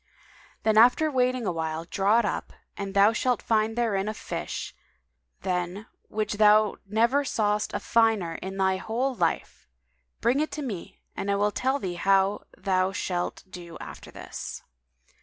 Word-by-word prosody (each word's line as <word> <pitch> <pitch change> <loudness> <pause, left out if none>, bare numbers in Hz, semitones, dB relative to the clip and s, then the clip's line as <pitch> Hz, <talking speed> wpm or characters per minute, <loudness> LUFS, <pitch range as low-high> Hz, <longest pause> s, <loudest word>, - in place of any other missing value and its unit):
[FN#196] - - -28
Then 215 -1 +3
after 250 +7 +5
waiting 255 -2 +1
awhile, 160 -2 -2
draw 200 +5 +2
it 235 - +3
up - - -3 0.2
and 200 -1 -5
thou 200 +3 +6
shalt 250 +1 +1
find 220 0 +1
therein 210 -4 +1
a 215 - -4
fish, - - -5 0.7
than 180 +2 -2 0.2
which 210 -1 -2
thou 210 0 +5
never 235 +7 +2
sawest 210 -5 0
a - - 0
finer 225 -7 +2
in 190 +1 -5
thy 190 -1 +2
whole 240 +7 -1
life. 175 -8 -2 0.5
Bring 240 +4 +2
it 310 - 0
to 300 - -4
me 195 -6 -6 0.2
and 200 - -3
I 200 - +2
will 205 +1 +2
tell 260 +6 0
thee 185 -10 -4
how 195 +1 +2
thou 185 -1 +1
shalt 180 -2 -3
do 175 -2 -10
after - - -9
this." - - -7
210 Hz, 160 wpm, -27 LUFS, 190-230 Hz, 0.7 s, thou